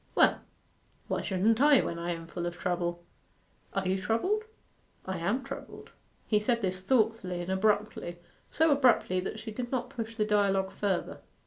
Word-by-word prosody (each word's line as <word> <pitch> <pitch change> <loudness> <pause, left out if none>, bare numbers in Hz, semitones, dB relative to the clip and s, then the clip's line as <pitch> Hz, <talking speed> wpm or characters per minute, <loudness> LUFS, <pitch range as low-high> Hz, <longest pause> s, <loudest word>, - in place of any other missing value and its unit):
'Well, - - +4 0.7
why - - -1
shouldn't 210 +5 +2
I 290 -2 +7
when 170 - -3
I 170 +1 -3
am 165 -1 -5
full 175 +1 -4
of 175 0 -5
trouble?' 175 -1 -2 0.7
'Are 195 -1 0
you 190 +1 0
troubled?' 375 - 0 0.6
'I 190 -1 -3
am 205 +10 0
troubled.' - - -9 0.3
He 210 - +3
said 235 +1 0
this 185 -1 -1
thoughtfully 220 -5 +1
and 175 +2 -4
abruptly 205 -3 0 0.3
so 320 0 +3
abruptly 250 -9 +4
that 190 +3 -4
she 220 0 -7
did 240 +2 -5
not 255 -1 -2
push 230 -3 -5
the 215 -2 +1
dialogue 195 -2 +2
further. 195 -3 -2
205 Hz, 170 wpm, -30 LUFS, 185-230 Hz, 0.7 s, I